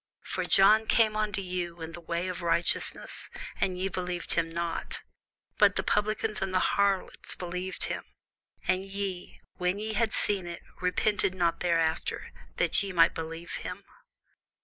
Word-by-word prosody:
For -, -, -2 dB
John 215 Hz, +3 st, +6 dB
came 220 Hz, -2 st, +4 dB
unto 210 Hz, -2 st, -1 dB
you 175 Hz, -2 st, -3 dB
in 160 Hz, 0 st, -6 dB
the 170 Hz, +1 st, -9 dB
way 170 Hz, +2 st, -2 dB
of 180 Hz, -1 st, -4 dB
righteousness, 170 Hz, 0 st, +2 dB, 0.3 s
and 185 Hz, -1 st, 0 dB
ye 185 Hz, +1 st, 0 dB
believed 180 Hz, -2 st, -2 dB
him 165 Hz, -1 st, +1 dB
not: 170 Hz, 0 st, -3 dB, 0.6 s
but -, -, +6 dB
the -, -, 0 dB
publicans 215 Hz, 0 st, 0 dB
and 195 Hz, -1 st, -1 dB
the -, -, +5 dB
harlots 200 Hz, -1 st, 0 dB
believed 180 Hz, +1 st, -3 dB
him: -, -, -1 dB, 0.6 s
and 185 Hz, +1 st, +2 dB
ye, 195 Hz, -2 st, -5 dB, 0.2 s
when 180 Hz, +2 st, 0 dB
ye 215 Hz, +1 st, -3 dB
had 220 Hz, +1 st, +2 dB
seen 195 Hz, -4 st, 0 dB
it, 170 Hz, 0 st, -7 dB, 0.2 s
repented 185 Hz, +1 st, +1 dB
not 175 Hz, -2 st, +1 dB
afterward, 165 Hz, -2 st, 0 dB, 0.3 s
that -, -, +3 dB
ye 200 Hz, -1 st, -3 dB
might 170 Hz, -2 st, +5 dB
believe 165 Hz, +1 st, -5 dB
him. 180 Hz, +2 st, -6 dB
185 Hz, 155 wpm, -29 LUFS, 170-200 Hz, 0.6 s, John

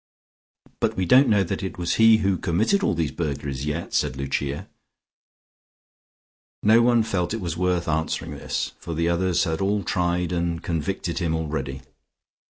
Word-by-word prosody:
"But -, -, 0 dB
we 95 Hz, -, +1 dB
don't 130 Hz, +8 st, +6 dB
know 105 Hz, -3 st, +4 dB
that 90 Hz, -, -3 dB
it 95 Hz, -, -5 dB
was 85 Hz, -1 st, -1 dB
he 115 Hz, 0 st, +7 dB
who 95 Hz, -2 st, +1 dB
committed 110 Hz, -, +1 dB
all -, -, +1 dB
these 80 Hz, -3 st, -1 dB
burglaries 70 Hz, -3 st, -3 dB
yet," 80 Hz, +3 st, -3 dB
said 65 Hz, -, 0 dB
Lucia. 70 Hz, +1 st, -3 dB, 2.0 s
No 110 Hz, +2 st, +6 dB
one 120 Hz, -1 st, +4 dB
felt 100 Hz, -2 st, -1 dB
it -, -, -4 dB
was 85 Hz, -4 st, -3 dB
worth 90 Hz, -1 st, 0 dB
answering 80 Hz, 0 st, -1 dB
this, -, -, -3 dB
for 85 Hz, -, -6 dB
the 85 Hz, +1 st, 0 dB
others 90 Hz, +1 st, +1 dB
had 80 Hz, -2 st, -2 dB
all 100 Hz, +1 st, +1 dB
tried 90 Hz, -1 st, 0 dB
and 85 Hz, -1 st, -2 dB
convicted 85 Hz, +2 st, -2 dB
him 85 Hz, -3 st, 0 dB
already. 70 Hz, -4 st, -4 dB
85 Hz, 165 wpm, -24 LUFS, 80-95 Hz, 2.0 s, he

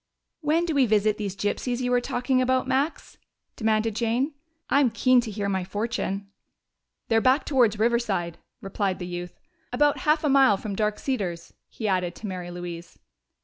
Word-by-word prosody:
"When 320 Hz, +2 st, +1 dB
do 330 Hz, -, -1 dB
we 275 Hz, -3 st, +3 dB
visit 210 Hz, 0 st, +2 dB
these 200 Hz, -2 st, -3 dB
gypsies 240 Hz, +5 st, -2 dB
you 250 Hz, -1 st, -1 dB
were 245 Hz, 0 st, +3 dB
talking 255 Hz, +1 st, 0 dB
about, 255 Hz, 0 st, +1 dB
Max?" 275 Hz, +5 st, -2 dB, 0.4 s
demanded 220 Hz, -1 st, 0 dB
Jane. 240 Hz, +6 st, 0 dB, 0.3 s
"I'm 280 Hz, -3 st, +4 dB
keen 250 Hz, +2 st, +3 dB
to 230 Hz, -, -6 dB
hear 205 Hz, -1 st, -3 dB
my 190 Hz, -2 st, -1 dB
fortune." 200 Hz, 0 st, -3 dB, 0.8 s
"They're 225 Hz, -1 st, +3 dB
back 260 Hz, +4 st, +3 dB
towards 240 Hz, -7 st, +3 dB
Riverside," 215 Hz, -7 st, 0 dB, 0.2 s
replied 195 Hz, -1 st, -2 dB
the 180 Hz, -, -6 dB
youth. 175 Hz, 0 st, -7 dB, 0.3 s
"About 290 Hz, +4 st, +2 dB
half 305 Hz, +1 st, +2 dB
a -, -, +2 dB
mile 270 Hz, -7 st, +5 dB
from 200 Hz, 0 st, -5 dB
Dark 210 Hz, 0 st, 0 dB
Cedars," 185 Hz, -11 st, -3 dB, 0.2 s
he 220 Hz, -, -4 dB
added, 180 Hz, -3 st, 0 dB
to -, -, -9 dB
Mary 180 Hz, -3 st, -5 dB
Louise. 175 Hz, -1 st, -8 dB
220 Hz, 170 wpm, -25 LUFS, 195-255 Hz, 0.8 s, mile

